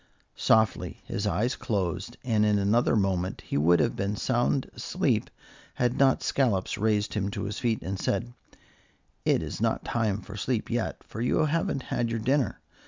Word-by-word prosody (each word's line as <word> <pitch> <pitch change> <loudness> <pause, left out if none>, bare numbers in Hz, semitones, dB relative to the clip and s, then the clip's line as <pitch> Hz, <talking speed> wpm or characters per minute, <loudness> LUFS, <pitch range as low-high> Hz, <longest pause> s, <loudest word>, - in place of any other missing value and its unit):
Softly 110 -1 +2
his 100 +1 -2
eyes 120 +5 0
closed, 95 +1 -2
and 110 -4 +2
in 105 -1 +3
another 105 +5 +3
moment 95 -3 0
he - - -5
would 80 +4 +4
have - - +1
been 100 +2 -1
sound 125 +4 +1
asleep - - 0 0.5
had 120 0 +1
not 135 -1 +4
Scollops 115 -9 +1
raised 105 -1 +1
him 100 -2 -1
to - - -4
his 105 - -4
feet 115 -3 0
and 95 0 -3
said: - - -1 0.9
"It - - +3
is - - -5
not - - 0
time 110 -3 0
for 105 - -9
sleep 110 +2 -2
yet, 120 -1 -2
for 110 - -7
you 125 +5 +2
haven't 150 -3 0
had 120 -1 0
your 115 - -1
dinner. 130 0 0
110 Hz, 170 wpm, -27 LUFS, 100-120 Hz, 0.9 s, would